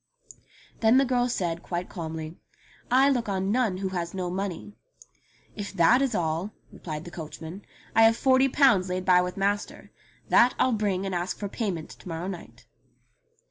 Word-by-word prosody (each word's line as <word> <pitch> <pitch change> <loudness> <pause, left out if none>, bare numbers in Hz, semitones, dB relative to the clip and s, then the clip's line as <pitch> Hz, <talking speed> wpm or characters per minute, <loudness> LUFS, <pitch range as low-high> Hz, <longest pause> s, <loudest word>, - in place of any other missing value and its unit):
Then 225 +3 +5
the 275 - +4
girl 250 -1 +1
said 170 -7 -2
quite 175 0 -4
calmly, 160 -2 -6 0.5
"I 260 +3 +5
look 245 -6 +1
on 190 0 -1
none 225 -5 +1
who 190 0 -2
has 175 -1 -4
no 180 -2 -3
money." 195 +1 -4 0.8
"If 205 -1 -6
that 195 +8 +4
is 265 -5 0
all," 165 +4 -1 0.2
replied 155 -2 -7
the 175 - -9
coachman, 160 +3 -8 0.3
*'I 225 - +6
have 225 0 +6
forty 265 0 +4
pounds 225 -10 +4
laid 185 0 -3
by 180 -1 +5
with 180 +1 -4
master. 200 +1 -2 0.4
That 245 +1 +5
I'll 255 - +2
bring 200 -3 -1
and 190 - -3
ask 175 +1 -2
for 205 - -4
payment 190 -8 -4
to - - -14
morrow 165 +1 -4
night." 185 -3 -9
190 Hz, 175 wpm, -26 LUFS, 175-225 Hz, 0.8 s, I